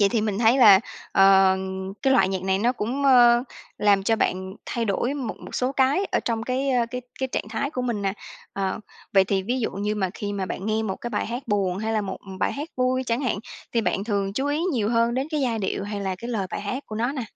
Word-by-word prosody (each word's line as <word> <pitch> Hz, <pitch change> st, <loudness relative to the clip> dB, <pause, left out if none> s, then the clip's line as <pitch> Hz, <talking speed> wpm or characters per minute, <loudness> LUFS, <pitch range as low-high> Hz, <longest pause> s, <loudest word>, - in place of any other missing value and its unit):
Vậy 200 Hz, -, +5 dB
thì 230 Hz, +1 st, 0 dB
mình 210 Hz, -2 st, -1 dB
thấy 235 Hz, +3 st, +4 dB
là, 200 Hz, -6 st, +8 dB, 0.3 s
ờ, 195 Hz, -1 st, +6 dB, 0.5 s
cái 270 Hz, -1 st, +3 dB
loại 195 Hz, -8 st, +4 dB
nhạc 190 Hz, -1 st, -2 dB
này 190 Hz, 0 st, +1 dB
nó 235 Hz, +5 st, +2 dB
cũng, 250 Hz, +4 st, -3 dB
mơ, 240 Hz, -3 st, +6 dB, 0.4 s
làm 200 Hz, -2 st, +4 dB
cho 225 Hz, +3 st, +2 dB
bạn 190 Hz, -2 st, -1 dB
thay 235 Hz, -2 st, -2 dB
đổi 230 Hz, +6 st, 0 dB
một 265 Hz, -6 st, -4 dB
một -, -, -10 dB
số 255 Hz, +1 st, 0 dB
cái 275 Hz, +8 st, +2 dB
ở -, -, 0 dB
trong 230 Hz, -1 st, -2 dB
cái, 260 Hz, +3 st, -1 dB
ơ, 245 Hz, -2 st, +2 dB
cái 250 Hz, -, -4 dB, 0.2 s
cái 265 Hz, -, 0 dB
trạng -, -, -2 dB
thái 280 Hz, -, -2 dB
của 255 Hz, -5 st, -3 dB
mình 235 Hz, -5 st, -2 dB
nè, 195 Hz, -1 st, 0 dB, 0.4 s
ờ, 195 Hz, +1 st, -2 dB, 0.3 s
vậy 195 Hz, -1 st, +5 dB
thì 190 Hz, 0 st, 0 dB
ví 245 Hz, +6 st, -1 dB
dụ 225 Hz, -, -1 dB
như 205 Hz, +2 st, -2 dB
mà 190 Hz, -3 st, -1 dB
khi 205 Hz, -1 st, -4 dB
mà 195 Hz, -2 st, -2 dB
bạn 190 Hz, -, -5 dB
nghe 220 Hz, 0 st, 0 dB
một 195 Hz, -3 st, -3 dB
cái 240 Hz, -, -6 dB
bài -, -, -1 dB
hát 240 Hz, +4 st, -4 dB
buồn 195 Hz, -4 st, +1 dB
hay 220 Hz, +2 st, -2 dB
là 220 Hz, -, +1 dB
một, 190 Hz, -2 st, -4 dB
ừm, 190 Hz, -1 st, -8 dB
bài -, -, 0 dB
hát 295 Hz, +3 st, -5 dB
vui 255 Hz, 0 st, +1 dB
chẳng 235 Hz, +2 st, 0 dB
hạn, 250 Hz, -7 st, -1 dB, 0.3 s
thì 235 Hz, -, +2 dB
bạn 200 Hz, -2 st, -1 dB
thường 200 Hz, -3 st, -1 dB
chú 265 Hz, +7 st, -1 dB
ý 290 Hz, +2 st, 0 dB
nhiều 220 Hz, -6 st, 0 dB
hơn 230 Hz, 0 st, +2 dB
đến 265 Hz, +3 st, -1 dB
cái 305 Hz, -2 st, -1 dB
giai 240 Hz, -4 st, 0 dB
điệu 195 Hz, -1 st, -2 dB
hay 205 Hz, 0 st, -4 dB
là 190 Hz, -1 st, -2 dB
cái 235 Hz, -, -7 dB
lời 205 Hz, -5 st, -1 dB
bài -, -, -4 dB
hát 215 Hz, +7 st, -4 dB
của 215 Hz, -, -6 dB
nó 240 Hz, +4 st, 0 dB
nè? 275 Hz, -3 st, -3 dB
225 Hz, 270 wpm, -24 LUFS, 195-255 Hz, 0.5 s, là